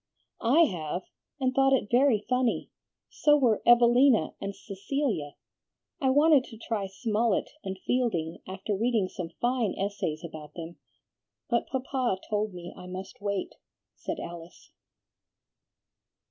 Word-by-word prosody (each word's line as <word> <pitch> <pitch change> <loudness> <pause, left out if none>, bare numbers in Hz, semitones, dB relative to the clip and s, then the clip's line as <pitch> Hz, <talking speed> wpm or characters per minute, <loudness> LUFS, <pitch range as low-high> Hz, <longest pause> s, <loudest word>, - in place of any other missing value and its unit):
"I 305 +7 +6
have, 175 - 0 0.4
and 260 -1 +1
thought 270 +1 +4
it 215 -6 +1
very 245 -4 +4
funny; 250 -1 0 0.4
so 295 0 +3
were 240 -7 +2
'Evelina' 240 +1 +5
and 200 0 -4
'Cecilia.' 200 - -3 0.7
I 265 - +3
wanted 290 0 +5
to 225 - -11
try 215 -3 -3
Smollett 215 +2 0
and 190 0 -4
Fielding, 185 -11 0
after 195 +2 -3
reading 220 -2 +1
some 180 -4 -6
fine 240 -4 +1
essays 190 -6 -2
about 155 -3 -9
them, 170 0 -7 0.7
but 235 - +1
Papa 255 -5 -1
told 210 0 0
me 175 0 -9
I 180 -1 -10
must 185 +2 -8
wait," 200 -1 -2 0.4
said - - -5
Alice. 170 +1 -9
215 Hz, 130 wpm, -28 LUFS, 185-255 Hz, 0.7 s, I